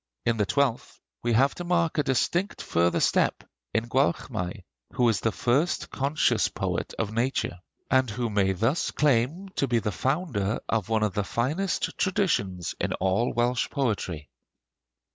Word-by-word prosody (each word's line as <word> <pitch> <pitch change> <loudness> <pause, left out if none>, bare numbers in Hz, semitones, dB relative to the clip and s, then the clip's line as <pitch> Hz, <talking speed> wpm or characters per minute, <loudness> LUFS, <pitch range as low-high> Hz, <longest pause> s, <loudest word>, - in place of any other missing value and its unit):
In 115 -1 +2
the 105 -2 +1
twelfth 140 -5 0 0.2
we 120 0 0
have 135 +5 +4
to 175 - -6
mark 170 -2 +1
a - - +3
distinct 170 - 0
further 85 +1 +1
step - - +2 0.3
in 115 +1 0
Gwalchmai, 120 - -1 0.3
who 125 - +3
is 105 -4 +1
the 115 - 0
first 140 +11 0
conscious 140 +3 +1
poet - - -3
of 110 -1 -2
nature, 115 -6 -1 0.3
and 130 -2 +4
who 115 +1 -2
may 95 -2 +2
thus 115 - 0
claim 150 +7 +1
to 140 - +2
be 120 -1 +2
the 110 -2 -1
founder 130 - -1
of 115 -1 -1
one 110 -1 +2
of 105 -3 0
the 105 - 0
finest 150 - -1
traditions 100 - 0
in - - -1
all 95 +6 +1
Welsh 120 +1 +1
poetry. 100 - -2
120 Hz, 160 wpm, -27 LUFS, 105-140 Hz, 0.3 s, have